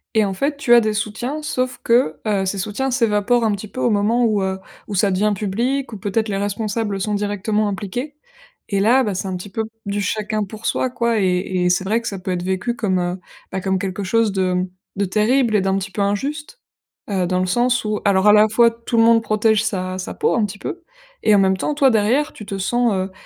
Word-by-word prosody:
et 215 -1 +4
en 195 - -2
fait, 280 +8 -1
tu 245 -4 +3
as 235 - +8
des 215 -1 0
soutiens, 220 +8 -3
sauf 255 -3 -2
que 230 -10 +2
heu, 200 -3 +1
ces 195 - -2
soutiens 210 +8 -2
s'évaporent 230 -1 +2
un 215 - +2
petit 205 +1 -4
peu 255 - -8
au 235 - +2
moment 220 +4 +2
où, 210 -3 +1
heu, 190 0 -1 0.3
où 205 - -4
ça 195 +1 +2
devient 205 +3 +1
public 235 +7 -2
ou - - -5
peut-être 210 +3 -1
les 195 - -1
responsables 205 0 -2
sont 210 +2 -2
directement 205 +1 0
impliqués, 220 +9 -4 0.5
et 200 -1 0
là, 245 +6 +4
bah 205 -3 -1
c'est 190 +1 -3
un 185 - -3
petit 195 +3 -9
peu, 220 +2 -2 0.2
du 200 0 -2
chacun 215 +2 -1
pour 215 +3 -9
soi 260 - 0
quoi 235 -3 0
et 180 -1 0
et - - +3
c'est 180 +1 +1
vrai 225 +4 +1
que 230 - -6
ça 195 - -3
peut 185 0 -4
être 175 -1 -2
vécu 190 +6 -1
comme 190 -6 0
heu, 175 +1 -2 0.3
bah 190 0 -3
comme 190 0 0
quelque 195 +1 -3
chose 225 +2 +2
de 185 -1 +1 0.3
de 200 - +1
terrible 220 +4 +2
et 200 - +4
d'un 195 0 +1
petit 195 0 -4
peu 205 - -3
injuste. 290 - -2 0.5
Heu, 185 -3 0
dans 185 0 0
le 185 - +1
sens 245 +4 +1
où 210 0 -1
alors 195 0 +3
à 210 - +8
la 210 +1 +6
fois 230 +1 +4
tout 230 0 -4
le 225 - +6
monde 230 0 +5
protège 215 0 +2
sa 185 -3 -2
sa 185 - -5
peau - - +1
un 225 - +2
petit 200 0 -8
peu 345 0 -6 0.4
et 215 - +4
en - - +5
même 190 0 +3
temps 295 +9 -2
toi 275 -3 +4
derrière 240 +8 +1
tu 210 - -10
te 195 - -5
sens 240 +4 +1
heu, 190 0 -2
210 Hz, 245 wpm, -20 LUFS, 195-235 Hz, 0.5 s, as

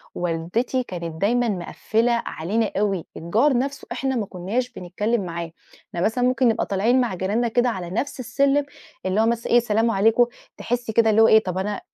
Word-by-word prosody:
والدتي 175 +10 -1
كانت 170 -5 -7
دايمًا 240 +3 +2
مقفّلة 215 +5 -1
علينا 205 +7 -1
أوي 195 -4 0
الجار 230 - +2
نَفْسه 275 +3 -3
إحنا 265 -1 -1
ما 220 - -1
كُنّاش 200 +8 -3
بنتكلّم 205 +3 -2
معاه، 170 -1 -5 0.4
إحنا 170 - -4
مثلًا 235 +5 +1
ممكن 255 0 +3
نبقى 225 -1 +1
طالعين 225 +7 +2
مع 230 -6 -1
جيراننا 205 +7 0
كده 245 +2 +2
على 185 -6 -4
نَفْس 245 +9 -3
السلم، 275 +3 +1 0.4
اللي 190 +4 +1
هو - - +3
مثلًا 235 0 -1
إيه 240 - +8
سلام 225 0 +1
عليكم 225 +4 +4 0.3
تحسّي 240 -2 -3
كده 225 -1 +4
اللي 220 +1 +4
هو 225 - +7
إيه 220 0 +6
طب 185 -1 -3
أنا 200 +2 -2
225 Hz, 185 wpm, -23 LUFS, 185-245 Hz, 0.4 s, إيه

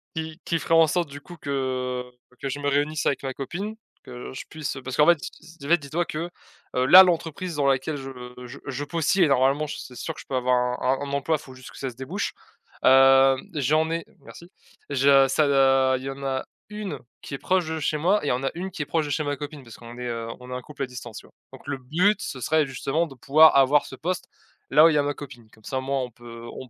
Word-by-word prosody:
qui 160 +1 -5
qui 170 - 0
ferait - - -1
en 165 -1 +6
sorte, 170 -1 0
du 145 +1 -9
coup, 175 +2 -12
que 130 -3 -2 0.4
que 135 - -3
je 145 +2 -4
me 145 - -2
réunisse 145 +2 0
avec 140 - +1
ma 135 -1 -3
copine, 190 +11 -5 0.3
que 125 -1 -9
je - - -6
puisse 155 -3 -5
parce 130 0 -5
qu'en 150 - +6
fait 175 -1 +6
ss 185 - -5
si 165 - -16
tu 140 - -10
en - - -5
fait, 170 - +6
dis-toi 155 +4 -2
que, 165 +3 -4 0.5
heu, 125 0 +2
là 180 +8 +11
l'entreprise 170 0 -1
dans 145 -1 0
laquelle 135 +3 0
je 135 -1 -7 0.4
je 125 +3 -10
je 135 +1 -3
postier 165 +3 +2
normalement 135 +2 +2
je - - -5
c'est 125 - -10
sûr - - -4
que - - -13
je - - -17
peux 135 - -3
avoir 125 0 +2 0.3
un 130 +1 +2
un 140 -1 -4
emploi, 140 +3 +1
faut 130 -3 -13
juste 130 0 -12
que - - -14
ça 135 - -3
se 120 - -12
débouche. 140 - -4 0.5
Hem, 135 0 +6
j'en 155 +3 +2
ai 165 0 -2
merci. 170 +2 -14 0.4
Je 135 0 +5
ça 145 +3 +2
da 135 -1 +4
il 130 - -9
y 135 - -4
en 140 +1 -9
a 135 -1 -2 0.2
1 210 -8 -5 0.2
qui - - -9
est 140 - -2
proche 185 +1 +1
de 160 0 -3
chez 155 0 0
moi 185 +7 +2
et - - -2
il - - +2
y - - +2
en 125 +2 -2
a 135 - 0
1 185 +2 -5
qui 175 -4 -6
est - - -2
proche 160 +1 0
de 145 - -5
chez 155 +2 0
ma 145 -1 -2
copine. 145 -1 -8
Parce 115 -2 -13
qu'on 120 0 -11
est, 125 - -5
heu, 115 -1 -4
on 125 0 -10
est - - -3
un 125 - -4
couple 145 +1 -7
à - - 0
distance, 125 -3 -9
tu - - -17
vois? - - -25 0.2
Donc - - -13
le 140 -1 -2
but 180 +11 +1
ce 130 - -5
serait 155 +4 +2
justement 140 +5 -1
de 135 - -13
pouvoir 155 +5 +6
avoir 140 +2 +5
ce 130 - -9
poste, 180 +6 -3 0.4
là 150 +3 +7
où 165 - +8
il 155 - +1
y - - +3
a 145 - +3
ma 145 0 -1
copine. 125 -6 -11
Comme 110 - -22
ça 130 - -3
au - - -4
moins 135 0 -1
on 125 - -6
peut, 120 0 -11
on 130 - -9
140 Hz, 275 wpm, -25 LUFS, 130-160 Hz, 0.5 s, là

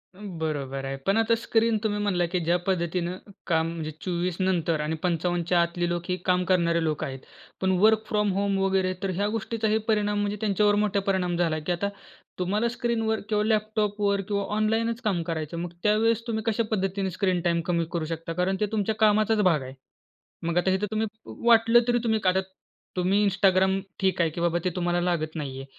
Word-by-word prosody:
बरोबर 155 -8 -4
आहे. 135 0 -3
पण 195 +2 +2
आता 225 0 +3
स्क्रीन 230 0 +1
तुम्ही 210 -1 0
म्हणला 180 -4 +1
की 180 +2 -1
ज्या 170 +2 +3
पद्धतीनं 175 -1 -1 0.3
काम 160 -2 +2
म्हणजे 160 -2 -5
24नंतर 175 -2 0
आणि 155 +2 -2
55च्या 175 0 +1
आतली 170 0 -1
लोक 175 0 -2
ही 180 - +1
काम 180 -1 +2
करणारे 170 -2 +2
लोक 155 -2 -1
आहेत. 135 -1 -5 0.4
पण 190 0 +2
वर्क 220 +2 +5
फ्रॉम 210 -2 +1
होम 200 0 0
वगैरे, 190 -1 +1
तर 195 - 0
ह्या 200 +2 0
गोष्टीचाही 220 -1 0
परिणाम 210 -1 +1
म्हणजे 205 0 -1
त्यांच्यावर 205 0 +2
मोठा 205 -1 +1
परिणाम 180 -2 0
झाला, 165 -3 +1
की 155 +4 -3
आता 175 +3 -1 0.5
तुम्हाला 205 +6 +1
स्क्रीनवर 230 -2 -1
किंवा 210 -1 +2
लॅपटॉपवर 210 -2 0
किंवा 200 -1 0
ऑनलाईनच 225 +2 0
काम 200 -7 0
करायचं. 165 -1 -4
मग 175 0 -4
त्यावेळेस 225 +2 +2
तुम्ही 220 -2 -2
कशा 225 +1 +1
पद्धतीने 195 -1 -1
स्क्रीन 185 -1 0
टाईम 170 -1 +1
कमी 170 -1 +1
करू 165 -2 -2
शकता? 165 +1 -5
कारण 180 +3 0
ते 210 - +2
तुमच्या 215 0 0
कामाचाच 215 0 +3
भाग 170 -7 +3
आहे. 130 0 -8 0.7
मग 170 +1 -1
आता 185 +2 +2
इथे 200 +2 0
तुम्ही 220 0 0 0.4
वाटलं 230 0 +6
तरी 240 - +3
तुम्ही 220 -2 +1
आता 185 0 +4 0.6
तुम्ही 190 +3 +2
Instagram 190 0 +3 0.2
ठीक 190 -1 +1
आहे 165 - +2
की 170 - -6
बाबा 170 0 +1
ते 185 - +1
तुम्हाला 175 -1 0
लागत 170 -3 -1
नाही 140 -4 -4
आहे 135 - -7
190 Hz, 190 wpm, -26 LUFS, 170-210 Hz, 0.7 s, वाटलं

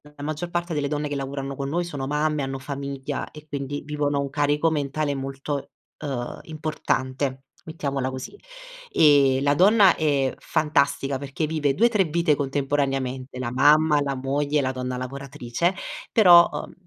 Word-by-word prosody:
la 145 - -9
maggior 155 +3 -3
parte 175 0 -2
delle 145 -2 -1
donne 150 0 -2
che 145 - -4
lavorano 135 0 -4
con 135 0 -4
noi 175 +4 0
sono 145 -6 -5
mamme, 150 +1 0
hanno 135 0 -3
famiglia 140 0 -5
e 150 0 -13
quindi 145 -1 -4
vivono 145 -1 -1
un 140 -1 -3
carico 145 +2 +1
mentale 145 0 -1
molto, 135 +1 -4 0.3
uhm, 130 -5 -4
importante, 135 -4 -2 0.2
mettiamola 140 -5 -3
così. 130 - -7 0.6
E 140 -3 +5
la 145 0 +3
donna 195 +4 +6
è 140 -4 +1
fantastica 140 -3 0
perché 140 +3 -3
vive 150 -3 0
2-3 215 -1 +3
vite 165 0 +2
contemporaneamente: 135 -2 -2
la 125 -2 -3
mamma, 150 +3 +4
la 140 -1 -1
moglie, 140 +3 0
la 130 -1 0
donna 125 -1 -4
lavoratrice; 140 +5 -3 0.4
però, 175 -6 +7
uhm, - - -6
145 Hz, 155 wpm, -24 LUFS, 135-155 Hz, 0.6 s, però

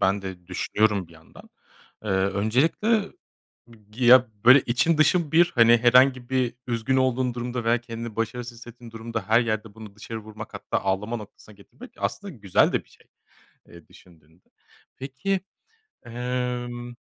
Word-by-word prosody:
Ben 100 +1 +1
de 95 -2 -8
düşünüyorum 100 0 0
bir 85 - -18
yandan. 80 0 -17 0.5
Eee, 105 - -3
öncelikle 120 - +1 0.8
ya, 125 0 +6 0.2
böyle 130 +3 +8
için 150 +8 +1
dışın 155 0 +2
bir. 175 +2 +4
Hani, 115 -1 +6
herhangi 125 +1 +4
bir 130 -2 0
üzgün 120 +2 -1
olduğun 130 -1 0
durumda 120 0 -4
veya 115 +1 +2
kendini 115 -2 -8
başarısız 120 +1 -4
hissettiğin 120 0 -13
durumda 115 -2 -6
her 110 +2 +5
yerde 110 -2 -3
bunu 110 -3 -12
dışarı 110 +1 -7
vurmak 110 0 -10
hatta - - -3
ağlama 105 +5 -1
noktasına 105 0 -13
getirmek 170 - -15
aslında 200 -2 -4
güzel 100 -5 +2
de - - -1
bir - - -30
şey, - - -23 0.6
eee, 85 -2 -15
düşündüğünde. 80 0 -22 0.5
Peki, 135 +9 -3 0.7
emm, 120 0 -4
120 Hz, 145 wpm, -24 LUFS, 105-125 Hz, 0.8 s, böyle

